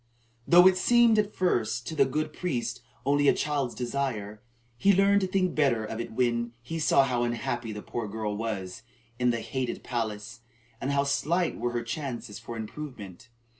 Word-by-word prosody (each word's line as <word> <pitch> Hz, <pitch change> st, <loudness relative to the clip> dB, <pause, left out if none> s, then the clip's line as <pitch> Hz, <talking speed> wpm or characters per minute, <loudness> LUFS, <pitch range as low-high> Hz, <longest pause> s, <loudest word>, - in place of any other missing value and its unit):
Though 175 Hz, +1 st, +8 dB
it 185 Hz, -1 st, +4 dB
seemed 235 Hz, +1 st, +5 dB
at 210 Hz, 0 st, -1 dB
first 120 Hz, -, 0 dB
to 160 Hz, -, -5 dB
the 140 Hz, -2 st, +5 dB
good 155 Hz, +3 st, -2 dB
priest 130 Hz, -8 st, -3 dB, 0.2 s
only 145 Hz, +1 st, +3 dB
a -, -, +5 dB
child's 145 Hz, -4 st, -1 dB
desire, 120 Hz, -5 st, -3 dB, 0.3 s
he 195 Hz, +11 st, +4 dB
learned 200 Hz, +1 st, +4 dB
to 190 Hz, -, 0 dB
think 185 Hz, -1 st, +1 dB
better 130 Hz, -7 st, +2 dB
of 110 Hz, +1 st, -5 dB
it 115 Hz, -1 st, -6 dB
when 120 Hz, 0 st, 0 dB
he 165 Hz, +7 st, -4 dB
saw 145 Hz, -3 st, +4 dB
how 125 Hz, -2 st, 0 dB
unhappy 120 Hz, -1 st, -2 dB
the 105 Hz, 0 st, -7 dB
poor 115 Hz, -2 st, -4 dB
girl 105 Hz, 0 st, -3 dB
was 105 Hz, -4 st, -4 dB, 0.4 s
in 125 Hz, 0 st, +3 dB
the 115 Hz, -1 st, 0 dB
hated 130 Hz, -1 st, -3 dB
palace, 115 Hz, -1 st, -4 dB, 0.4 s
and 135 Hz, -, -2 dB
how 140 Hz, 0 st, +2 dB
slight 160 Hz, +5 st, 0 dB
were 120 Hz, 0 st, -1 dB
her 120 Hz, -1 st, -1 dB
chances 120 Hz, -4 st, -5 dB
for 115 Hz, -, -7 dB
improvement. 110 Hz, -3 st, -8 dB
125 Hz, 180 wpm, -28 LUFS, 115-155 Hz, 0.4 s, Though